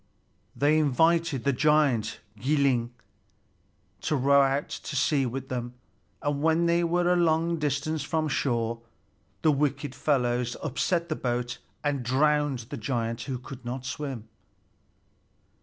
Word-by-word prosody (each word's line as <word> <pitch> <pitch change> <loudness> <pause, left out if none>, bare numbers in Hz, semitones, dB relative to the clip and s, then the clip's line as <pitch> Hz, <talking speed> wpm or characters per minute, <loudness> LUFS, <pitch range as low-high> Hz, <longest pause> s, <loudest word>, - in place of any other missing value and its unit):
They 150 +2 +3
invited 160 0 +2
the 140 - +2
giant 145 -4 +2 0.2
Gilling 135 -4 +2 1.1
to 155 - 0
row 140 +1 +5
out 135 +1 +1
to - - -6
sea 135 0 +2
with 130 +2 -5
them, 120 -1 -4 0.5
and 145 -1 -1
when 160 +2 +3
they 170 +1 +3
were 175 +1 +2
a - - +2
long 165 -1 +2
distance 150 +1 -1
from 155 +2 -1
shore, 115 -5 -1 0.6
the 155 - +5
wicked 145 -1 -1
fellows 125 -3 0
upset 170 +4 0
the 155 - 0
boat 120 -2 -2 0.2
and 145 -2 0
drowned 140 0 +1
the 145 - -4
giant, 115 0 -2
who 130 - -2
could 125 +1 -10
not 125 +2 -5
swim. 135 -4 -5
140 Hz, 135 wpm, -27 LUFS, 125-155 Hz, 1.1 s, row